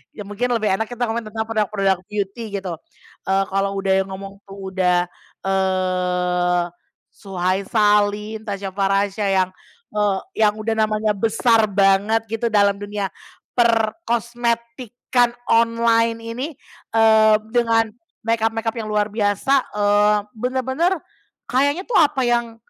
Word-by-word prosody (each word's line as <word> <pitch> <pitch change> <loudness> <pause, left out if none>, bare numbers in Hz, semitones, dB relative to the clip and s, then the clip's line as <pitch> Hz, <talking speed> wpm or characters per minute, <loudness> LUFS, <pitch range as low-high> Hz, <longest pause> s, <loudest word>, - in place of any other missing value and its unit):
ya 210 - -7
mungkin 235 +5 -1
lebih 215 -3 +1
enak 225 - -1
kita 245 0 -4
komen 225 -1 -2
tentang 220 +1 -3
produk-produk 210 -4 0
beauty 210 +2 -4 0.2
gitu. 170 -4 -5 0.5
Eee, 195 0 +2
kalau 195 0 0
udah 195 -1 -1
yang 190 0 +2
ngomong 195 +1 -8
tuh 195 -1 -8
udah, 180 -2 +2 0.4
eee, 180 -2 0 0.5
Suhay 190 -1 -2
Salim 210 -1 +2
Tasya 200 -1 -4
Farasya 195 +1 0 0.2
yang, 185 - -7 0.4
eee, 205 -2 +1 0.3
yang 210 - 0
udah 220 +1 -3
namanya 215 0 +1
besar 225 +2 +2
banget 200 +3 +2
gitu 225 +1 -1
dalam 200 -2 +2
dunia 205 -1 -4 0.4
perkosmetikan 235 0 0 0.2
online 230 0 +2
ini, 230 +5 -4 0.5
eee, 220 -1 +6 0.2
dengan 225 -2 +2 0.3
makeup-makeup 225 0 0
yang 215 - -4
luar 210 0 0
biasa, 205 +4 0 0.2
eee, 205 0 +3 0.2
bener-bener 260 - 0 0.6
kayaknya 285 +7 +2
tuh 450 +1 0
apa 290 -4 +3
yang 235 -1 0
215 Hz, 125 wpm, -21 LUFS, 195-230 Hz, 0.6 s, eee